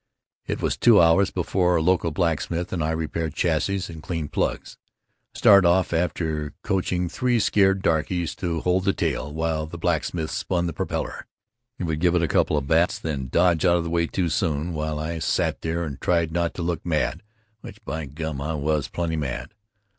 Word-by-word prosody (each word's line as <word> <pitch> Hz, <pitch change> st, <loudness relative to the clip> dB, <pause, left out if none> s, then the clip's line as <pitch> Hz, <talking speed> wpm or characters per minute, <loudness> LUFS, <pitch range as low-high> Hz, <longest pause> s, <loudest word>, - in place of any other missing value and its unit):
It -, -, -3 dB
was -, -, 0 dB
two 115 Hz, -4 st, +6 dB
hours 85 Hz, +4 st, +5 dB
before 90 Hz, 0 st, +1 dB
a 80 Hz, -, +2 dB
local 90 Hz, -1 st, +2 dB
blacksmith 85 Hz, +2 st, -1 dB
and 85 Hz, -4 st, -1 dB
I 75 Hz, -, 0 dB
repaired 80 Hz, 0 st, -2 dB
chassis 85 Hz, +4 st, 0 dB
and 80 Hz, -2 st, -9 dB
cleaned 80 Hz, -3 st, -4 dB
plugs. -, -, -2 dB, 0.6 s
I -, -, -7 dB
started 100 Hz, -3 st, +7 dB
off 90 Hz, 0 st, +2 dB
after 80 Hz, -3 st, -1 dB
coaching 90 Hz, -2 st, 0 dB
three 125 Hz, +6 st, 0 dB
scared 95 Hz, -2 st, +3 dB
darkies 80 Hz, +1 st, 0 dB
to 85 Hz, -3 st, -2 dB
hold 90 Hz, +1 st, +1 dB
the 95 Hz, -, +3 dB
tail, 75 Hz, -, -2 dB
while 80 Hz, 0 st, -2 dB
the 85 Hz, -, -8 dB
blacksmith 80 Hz, -1 st, -1 dB
spun 85 Hz, -1 st, -1 dB
the 85 Hz, -, -3 dB
propeller. -, -, -4 dB, 0.5 s
He -, -, -4 dB
would 80 Hz, -3 st, -1 dB
give 90 Hz, +1 st, +2 dB
it 85 Hz, -, +2 dB
a -, -, +2 dB
couple 75 Hz, -, +2 dB
of 70 Hz, -, -1 dB
bats, 80 Hz, +4 st, +2 dB
then 70 Hz, -5 st, -4 dB
dodge 85 Hz, +4 st, +2 dB
out 90 Hz, -1 st, +4 dB
of 85 Hz, -, -1 dB
the 85 Hz, -, -4 dB
way 85 Hz, 0 st, +1 dB
too 90 Hz, -1 st, -1 dB
soon, 80 Hz, -2 st, -1 dB
while 75 Hz, -1 st, -2 dB
I 80 Hz, +2 st, -3 dB
sat -, -, 0 dB
there 80 Hz, +1 st, -2 dB
and 70 Hz, -5 st, -6 dB
tried 85 Hz, -2 st, +1 dB
not 85 Hz, 0 st, -1 dB
to 90 Hz, -, -4 dB
look 85 Hz, -1 st, -2 dB
mad, 80 Hz, -3 st, -1 dB, 0.4 s
which 105 Hz, +1 st, -12 dB
by 80 Hz, -2 st, -4 dB
gum 75 Hz, 0 st, -5 dB
I 80 Hz, +3 st, -2 dB
was 75 Hz, -1 st, 0 dB
plenty 85 Hz, -2 st, -2 dB
mad. 65 Hz, +1 st, -4 dB
85 Hz, 200 wpm, -24 LUFS, 80-90 Hz, 0.6 s, started